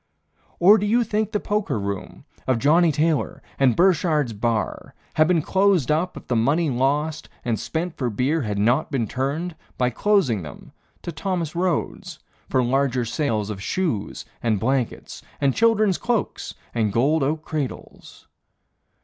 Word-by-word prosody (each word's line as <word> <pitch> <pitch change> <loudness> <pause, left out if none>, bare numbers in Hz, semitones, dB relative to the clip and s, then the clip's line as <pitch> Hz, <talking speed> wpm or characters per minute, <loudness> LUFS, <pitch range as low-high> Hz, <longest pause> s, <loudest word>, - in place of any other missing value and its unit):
Or 205 +5 +7
do 205 - -1
you 235 +3 +3
think 215 -1 -1
the 210 - 0
poker 205 - -1
room 100 -1 -5 0.2
Of 130 -2 +2
Johnnie 160 +7 +4
Taylor, 155 +1 0 0.2
and 130 -3 +4
Burchard's 160 -8 +2
bar 110 +1 -2 0.2
Had 155 0 +4
been 170 -3 +2
closed 190 -8 +2
up 170 +4 0
if - - -10
the 125 - -1
money 145 +7 +2
lost 145 +5 0 0.2
And 115 -3 0
spent 165 +1 -3
for 125 -3 -1
beer 130 +9 0
had 105 -5 -3
not 120 +9 +2
been 130 -6 -1
turned, 145 - -2 0.2
By 125 0 +1
closing 170 - +2
them, 75 -4 -11 0.3
to 170 - -4
Thomas 170 0 -3
Rhodes 175 -2 -2 0.3
For 130 - +2
larger 130 0 +1
sales 115 -4 -1
of 95 -2 -6
shoes 140 - -2 0.2
and 110 -4 +1
blankets, 130 +1 -2 0.2
And 140 -2 +2
children's 215 -4 +3
cloaks 240 -3 -2 0.2
and 110 -3 +1
gold 140 +9 +2
oak 150 +3 -1
cradles? 150 -5 -6
145 Hz, 155 wpm, -23 LUFS, 120-175 Hz, 0.3 s, Or